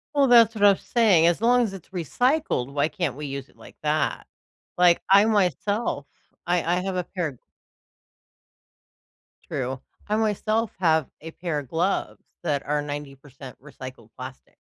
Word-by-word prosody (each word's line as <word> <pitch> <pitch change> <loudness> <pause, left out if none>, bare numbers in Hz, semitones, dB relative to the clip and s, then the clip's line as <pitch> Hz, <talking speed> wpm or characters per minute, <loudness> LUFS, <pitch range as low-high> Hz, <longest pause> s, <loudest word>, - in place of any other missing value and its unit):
Well, 280 -1 +4
that's 235 -2 +6
what 210 - -3
I 205 - +9
was - - -8
saying, 210 -9 +4
as 170 +3 +2
long 245 +2 +4
as 210 -4 -3
it's 190 -4 -11
recycled, 190 - 0
why 145 +1 +1
can't 170 -9 -3
we 150 - -6
use 140 0 -6
it - - -26
like - - -15
that? 150 0 -1 0.5
Like, 175 -1 +5
I 200 +2 +7
myself 205 - 0 0.4
I 175 0 +1
I 175 +2 +1
have 190 -1 -3
a 180 - -1
pair 160 -10 -4 2.1
True. 130 0 -3 0.3
I 210 - 0
myself 215 0 0
have 160 -5 +2
a 160 +1 -8
pair 165 -4 -3
of 135 - -9
gloves 175 +7 -1 0.2
that 145 -5 -1
are 150 0 0
90% 140 -2 -8
recycled 130 -5 -11
plastic. 130 +1 -10
170 Hz, 160 wpm, -24 LUFS, 145-205 Hz, 2.1 s, I